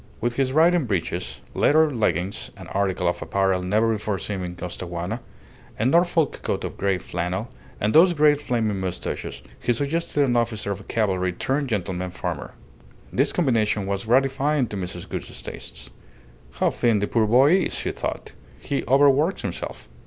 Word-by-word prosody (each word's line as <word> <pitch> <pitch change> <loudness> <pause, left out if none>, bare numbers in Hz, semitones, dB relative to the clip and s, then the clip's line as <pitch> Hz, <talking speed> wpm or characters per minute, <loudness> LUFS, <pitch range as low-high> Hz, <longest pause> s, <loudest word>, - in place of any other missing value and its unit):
With 120 +1 0
his 135 -1 +1
riding 165 +2 +4
breeches, 85 - -3
leather 155 +1 +4
leggings 95 -4 -1
(an - - -9
article 95 -2 0
of 85 - -1
apparel 95 -1 +1
never 110 +5 +2
before 105 -2 -2
seen 95 +2 -4
in 90 0 -5
Costaguana), 90 +4 -4 0.6
a 110 - 0
Norfolk 170 +2 +3
coat - - -2
of - - -4
grey 100 -1 +1
flannel, 90 +6 -3 0.3
and 105 +1 +1
those 175 +3 +7
great 150 -2 +4
flaming 110 -7 0
moustaches, 90 -9 -4 0.2
he - - +1
suggested 145 +3 0
an 120 -2 +1
officer 115 -3 0
of 100 0 -6
cavalry 95 -5 0
turned 135 +9 -1
gentleman 90 -4 -2
farmer. - - -5 0.6
This - - +2
combination 110 - +1
was 100 +1 -2
gratifying 135 +3 +2
to - - -5
Mrs. 90 -2 -5
Gould's - - -6
tastes. - - -7 0.6
"How - - +1
thin 115 -3 +2
the 105 - +1
poor 110 0 +1
boy 130 +8 +6
is!" 190 - -1
she - - -2
thought. - - -5 0.3
"He 140 - -2
overworks 140 +6 +4
himself." 90 -8 -5
110 Hz, 160 wpm, -24 LUFS, 95-140 Hz, 0.6 s, those